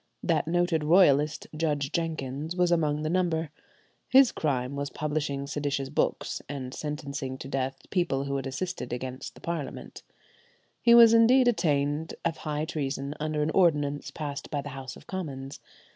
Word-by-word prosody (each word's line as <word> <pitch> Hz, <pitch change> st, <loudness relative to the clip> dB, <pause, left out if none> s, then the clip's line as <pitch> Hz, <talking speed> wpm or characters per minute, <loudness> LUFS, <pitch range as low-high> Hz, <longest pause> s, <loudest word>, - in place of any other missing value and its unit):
That 160 Hz, -3 st, +1 dB
noted 175 Hz, -2 st, +1 dB
royalist, 150 Hz, -3 st, +4 dB
Judge 150 Hz, -3 st, -1 dB
Jenkins, 155 Hz, -1 st, -3 dB
was 180 Hz, -1 st, +2 dB
among 150 Hz, -3 st, +1 dB
the -, -, -1 dB
number. 170 Hz, -3 st, 0 dB, 0.6 s
His 265 Hz, -1 st, +7 dB
crime 135 Hz, -3 st, -1 dB
was 140 Hz, 0 st, -3 dB
publishing 145 Hz, -2 st, -2 dB
seditious 140 Hz, -1 st, -2 dB
books, 145 Hz, -, -1 dB
and 130 Hz, -3 st, -5 dB
sentencing 140 Hz, -3 st, -4 dB
to 135 Hz, -, -8 dB
death 135 Hz, 0 st, -2 dB
people 175 Hz, -8 st, +1 dB
who 140 Hz, 0 st, -3 dB
had 135 Hz, -, -4 dB
assisted 165 Hz, 0 st, -4 dB
against 130 Hz, +1 st, -5 dB
the -, -, -15 dB
Parliament. 165 Hz, -6 st, -5 dB, 0.8 s
He 235 Hz, 0 st, +6 dB
was 230 Hz, -1 st, +9 dB
indeed 245 Hz, +3 st, +6 dB
attainted 150 Hz, -7 st, +1 dB
of 165 Hz, -1 st, 0 dB
high 150 Hz, 0 st, -3 dB
treason 140 Hz, -3 st, -3 dB
under 155 Hz, 0 st, -1 dB
an 155 Hz, -, 0 dB
ordinance 150 Hz, -6 st, +2 dB
passed 145 Hz, -3 st, -6 dB
by 145 Hz, -2 st, -2 dB
the 145 Hz, -, -7 dB
House 130 Hz, -1 st, -7 dB
of -, -, -15 dB
Commons. 140 Hz, -7 st, -6 dB
150 Hz, 160 wpm, -28 LUFS, 140-170 Hz, 0.8 s, was